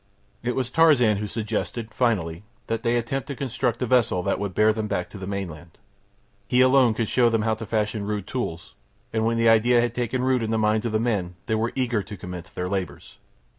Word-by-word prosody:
It 120 +1 -2
was 130 -2 -2
Tarzan 135 -10 +5
who 105 +1 -3
suggested, 110 +1 -4
finally, 95 -9 0 0.2
that 115 0 -2
they 120 0 +1
attempt 120 +3 -2
to 140 - -5
construct 125 -2 -2
a - - +1
vessel 120 -7 +2
that - - 0
would 100 -2 -4
bear 110 0 +4
them 110 -1 -3
back 100 -4 -3
to 100 - -9
the 95 - -6
mainland. 90 -5 -6 0.7
He 125 - +2
alone 130 -3 +5
could 115 -1 -1
show 120 +1 +3
them 115 -2 +1
how 110 0 +1
to 110 0 -6
fashion 105 -1 -1
rude 105 -2 -2
tools, 85 -11 -4 0.4
and 110 0 +1
when 115 0 +1
the 115 0 +3
idea 115 +2 +5
had 120 -1 +1
taken 125 +1 -1
root 130 -1 +2
in 110 - -2
the 110 - +1
minds 110 +1 +1
of - - -3
the 110 - +1
men 100 -7 -1
they - - -1
were 110 +2 0
eager 125 -5 0
to 100 +1 -9
commence 90 0 -8
their 90 - -4
labours. 95 -1 -5
110 Hz, 225 wpm, -24 LUFS, 100-120 Hz, 0.7 s, Tarzan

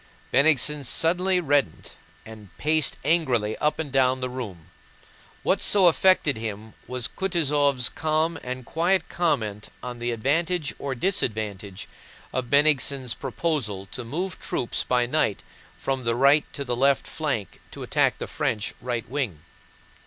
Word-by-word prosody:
Bennigsen 145 +1 +4
suddenly 180 +7 +2
reddened 145 - 0 0.3
and 110 -3 -11
paced 155 -1 +2
angrily 130 -10 +1
up 150 0 +1
and 155 -4 -4
down 130 -1 +2
the 125 0 -3
room. 105 -11 -7 0.7
What - - +1
so 200 -3 +5
affected 170 -5 +4
him 110 -1 -6
was 125 -1 -2
Kutúzov's 145 -8 +1
calm 155 +1 0
and 125 0 -6
quiet 175 +7 +1
comment 110 -12 -1
on 125 -1 -6
the 120 +1 -2
advantage 150 +7 0
or 135 -2 -3
disadvantage 105 - -2 0.5
of 125 -2 -2
Bennigsen's 140 -3 +3
proposal 130 - -2
to 125 - -6
move 180 +10 -4
troops 120 - -2
by 125 -1 +1
night 125 -5 0 0.3
from 135 -1 -2
the 115 0 0
right 140 +4 +4
to 140 - -5
the 120 -1 -1
left 135 +2 +2
flank 140 - -4
to - - -9
attack - - +2
the - - -5
French 105 -1 -2
right 120 -2 -3
wing. 120 - -3
135 Hz, 140 wpm, -25 LUFS, 115-155 Hz, 0.7 s, so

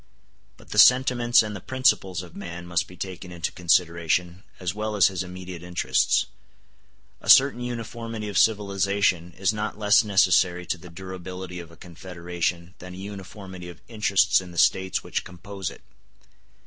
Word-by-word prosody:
But - - -18
the - - 0
sentiments 125 -2 +5
and 105 -1 -5
the - - -6
principles 95 -8 +1
of 85 - -14
man 85 -3 -7
must 85 -1 -1
be 90 - -14
taken 90 0 -7
into 85 -1 -3
consideration 85 0 +1 0.2
as 90 -1 -2
well 105 +1 -3
as 100 -3 +5
his 95 -2 -4
immediate 90 -1 -8
interests. 90 0 +1 1.0
A - - -7
certain 135 -2 +7
uniformity 115 -2 -5
of 100 - -6
civilization 100 -4 +1
is 95 +2 +1
not 105 -1 -4
less 105 +1 +4
necessary 90 -3 +3
to 90 - -3
the 90 - -12
durability 95 0 -8
of 85 -2 -10
a 85 - -17
confederation 85 0 -5
than 90 0 -10
a - - -10
uniformity 95 -2 -9
of 85 - -12
interests 100 -7 +2
in 90 - -11
the 85 - -12
States 95 +3 +2
which - - -3
compose 95 +2 -7
it. - - -14
95 Hz, 160 wpm, -25 LUFS, 90-105 Hz, 1.0 s, certain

